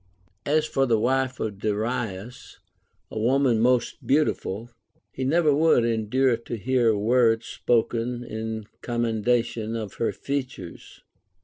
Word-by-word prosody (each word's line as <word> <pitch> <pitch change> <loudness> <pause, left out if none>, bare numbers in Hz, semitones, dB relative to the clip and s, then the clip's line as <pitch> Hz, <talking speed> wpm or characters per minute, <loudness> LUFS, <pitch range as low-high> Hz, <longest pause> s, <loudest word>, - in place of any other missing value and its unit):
As 155 +1 +2
for 135 -3 0
the 115 -2 +3
wife 130 +3 0
of 105 -3 -4
Darius, 110 +1 -3 0.5
a 110 - -4
woman 125 0 +2
most 125 +1 +1
beautiful, 120 -6 0 0.4
he 130 - -5
never 155 +2 +3
would 150 -6 +4
endure 115 +2 +1
to 115 0 -6
hear 125 +1 +2
a 110 - +2
word 115 +1 +3
spoken 120 +1 -1
in 110 -1 -5 0.2
commendation 115 -1 0
of 110 -4 -5
her 115 - +1
features. 130 -10 -6
120 Hz, 125 wpm, -25 LUFS, 110-130 Hz, 0.5 s, would